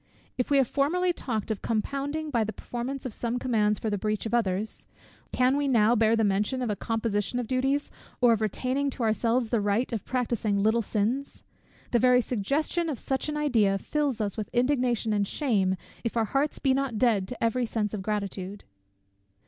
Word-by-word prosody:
If 250 Hz, -, -1 dB
we 285 Hz, -, +4 dB
have 270 Hz, -3 st, +4 dB
formerly 350 Hz, +7 st, +1 dB
talked 225 Hz, -8 st, -3 dB
of 210 Hz, -, -3 dB
compounding 280 Hz, +7 st, -2 dB
by 235 Hz, -4 st, +2 dB
the 215 Hz, -, -3 dB
performance 250 Hz, +5 st, -5 dB
of 250 Hz, -, -4 dB
some 235 Hz, +2 st, -2 dB
commands 215 Hz, -5 st, +1 dB
for 220 Hz, -, -3 dB
the 205 Hz, -, -1 dB
breach 215 Hz, +2 st, -1 dB
of 225 Hz, -, -4 dB
others; 215 Hz, -2 st, -1 dB, 0.4 s
can 255 Hz, +1 st, +3 dB
we 285 Hz, 0 st, 0 dB
now 235 Hz, -3 st, +4 dB
bear 225 Hz, 0 st, +4 dB
the 225 Hz, -, +2 dB
mention 210 Hz, +6 st, +1 dB
of 235 Hz, -, -1 dB
a -, -, -1 dB
composition 220 Hz, +1 st, -1 dB
of 245 Hz, -, -1 dB
duties, 270 Hz, +4 st, 0 dB, 0.3 s
or 245 Hz, -2 st, +5 dB
of 220 Hz, -, -1 dB
retaining 255 Hz, +6 st, 0 dB
to 250 Hz, -, -4 dB
ourselves 230 Hz, +2 st, +1 dB
the 230 Hz, -2 st, +1 dB
right 205 Hz, +5 st, 0 dB
of 220 Hz, -, -2 dB
practising 235 Hz, -5 st, -1 dB
little 220 Hz, +2 st, +3 dB
sins! 230 Hz, +6 st, -2 dB, 0.5 s
The 240 Hz, -, +3 dB
very 250 Hz, +1 st, +5 dB
suggestion 280 Hz, -, -1 dB
of 285 Hz, -, -3 dB
such 265 Hz, +5 st, -2 dB
an 300 Hz, -, -2 dB
idea 225 Hz, -10 st, +2 dB
fills 285 Hz, +4 st, -1 dB
us 205 Hz, -1 st, -2 dB
with 215 Hz, -, -4 dB
indignation 245 Hz, -3 st, +1 dB
and 205 Hz, -1 st, +1 dB
shame, 200 Hz, -10 st, +1 dB, 0.3 s
if 230 Hz, 0 st, -2 dB
our 225 Hz, -, +3 dB
hearts 275 Hz, +6 st, 0 dB
be 270 Hz, -2 st, +2 dB
not 270 Hz, -4 st, -1 dB
dead 210 Hz, -5 st, +2 dB
to 250 Hz, -, -5 dB
every 235 Hz, +1 st, +1 dB
sense 215 Hz, -2 st, -2 dB
of 210 Hz, -, -3 dB
gratitude. 200 Hz, -1 st, -4 dB
235 Hz, 195 wpm, -27 LUFS, 215-265 Hz, 0.5 s, or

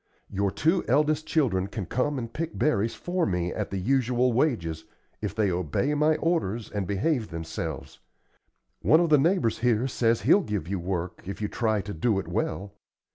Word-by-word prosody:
Your 100 Hz, 0 st, 0 dB
two 165 Hz, -, +1 dB
eldest 150 Hz, +4 st, +2 dB
children 110 Hz, -, +1 dB
can 100 Hz, -1 st, -5 dB
come 130 Hz, -, -1 dB
and 115 Hz, -2 st, -5 dB
pick 165 Hz, +1 st, -4 dB
berries 115 Hz, -7 st, +1 dB
for 180 Hz, 0 st, -2 dB
me 90 Hz, -2 st, -1 dB
at 105 Hz, -, -3 dB
the 100 Hz, -, -3 dB
usual 125 Hz, +3 st, +2 dB
wages, 85 Hz, -, 0 dB, 0.4 s
if 105 Hz, -2 st, -3 dB
they 105 Hz, -4 st, +2 dB
obey 90 Hz, -, 0 dB
my 150 Hz, +1 st, +3 dB
orders 150 Hz, -, -1 dB
and 100 Hz, -3 st, -2 dB
behave 110 Hz, +4 st, 0 dB
themselves. 80 Hz, -4 st, -6 dB, 0.8 s
One 155 Hz, -, +5 dB
of 170 Hz, -1 st, +2 dB
the 150 Hz, -, +7 dB
neighbors 155 Hz, -, +2 dB
here 120 Hz, +1 st, +2 dB
says 115 Hz, -3 st, +1 dB
he'll 150 Hz, -, +5 dB
give 105 Hz, -, -3 dB
you 95 Hz, 0 st, -2 dB
work, 90 Hz, 0 st, -3 dB
if 100 Hz, -, -5 dB
you 105 Hz, -, -1 dB
try 110 Hz, -2 st, 0 dB
to 100 Hz, +2 st, -6 dB
do 105 Hz, +5 st, +1 dB
it 95 Hz, -, -3 dB
well. 100 Hz, +1 st, -2 dB
115 Hz, 185 wpm, -27 LUFS, 95-145 Hz, 0.8 s, the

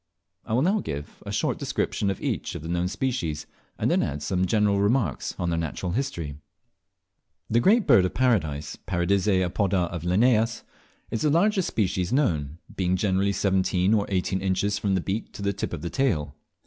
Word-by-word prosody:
I -, -, -4 dB
will 125 Hz, +4 st, +3 dB
now 200 Hz, +5 st, +2 dB
give 75 Hz, -, -6 dB
a -, -, -3 dB
short -, -, -1 dB
description 100 Hz, -, -1 dB
of 95 Hz, -, -2 dB
each -, -, -3 dB
of -, -, -6 dB
the -, -, -6 dB
known 90 Hz, +1 st, 0 dB
species, 90 Hz, -, -2 dB, 0.3 s
and -, -, +1 dB
then -, -, +3 dB
add 75 Hz, +1 st, -3 dB
some 95 Hz, +2 st, 0 dB
general 105 Hz, -1 st, +2 dB
remarks 100 Hz, -, 0 dB
on 85 Hz, -1 st, -1 dB
their 85 Hz, -, 0 dB
natural 85 Hz, +2 st, -3 dB
history. 85 Hz, -, -3 dB, 1.1 s
The 115 Hz, -, +4 dB
Great 210 Hz, -, +4 dB
Bird 120 Hz, -9 st, +6 dB
of 90 Hz, -, -3 dB
Paradise 85 Hz, -, 0 dB
(Paradisea 95 Hz, +1 st, +2 dB
apoda 90 Hz, -1 st, 0 dB
of 85 Hz, -2 st, -4 dB
Linnaeus) 110 Hz, +5 st, +2 dB, 0.5 s
is 115 Hz, -, -2 dB
the 150 Hz, -, +3 dB
largest 190 Hz, +4 st, +2 dB
species 95 Hz, -3 st, -1 dB
known, 80 Hz, -, 0 dB, 0.2 s
being 90 Hz, -1 st, +1 dB
generally 95 Hz, +1 st, +1 dB
seventeen 95 Hz, 0 st, +1 dB
or 105 Hz, -2 st, +2 dB
eighteen 95 Hz, -1 st, 0 dB
inches 100 Hz, +2 st, 0 dB
from 100 Hz, -2 st, +1 dB
the 95 Hz, -, +1 dB
beak 100 Hz, +5 st, -3 dB
to 100 Hz, -, -7 dB
the 100 Hz, 0 st, +1 dB
tip 100 Hz, -, -4 dB
of 85 Hz, -3 st, -5 dB
the 85 Hz, -, -2 dB
tail. 80 Hz, -, 0 dB
95 Hz, 185 wpm, -26 LUFS, 85-110 Hz, 1.1 s, Bird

